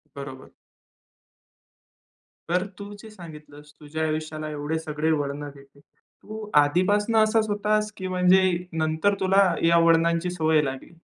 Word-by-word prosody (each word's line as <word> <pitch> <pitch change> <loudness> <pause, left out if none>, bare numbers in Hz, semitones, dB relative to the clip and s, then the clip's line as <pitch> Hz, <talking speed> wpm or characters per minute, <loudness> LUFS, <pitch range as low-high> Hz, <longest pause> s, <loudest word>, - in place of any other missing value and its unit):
बरोबर. 140 -2 -9 2.0
तर 180 +2 +1
तू 205 0 -8
जे 220 - -12
सांगितलंस 150 -6 -13
तुझ्या 155 +1 -5
आयुष्याला 155 0 -4
एवढे 150 +2 -3
सगळे 155 0 -2
वळण 145 -1 -2
देते. 140 0 -18
तू 215 +8 -12
आधीपासनं 205 +9 +1
असाच 215 0 +1
होतास, 210 +1 0
की 185 - -5
म्हणजे 185 +1 +4 0.3
नंतर 160 +4 0
तुला 190 -1 +3
या 170 0 +4
वळणांची 170 +1 +2
सवय 160 -3 +2
लागली? 135 +3 -6
165 Hz, 125 wpm, -24 LUFS, 150-195 Hz, 2.0 s, म्हणजे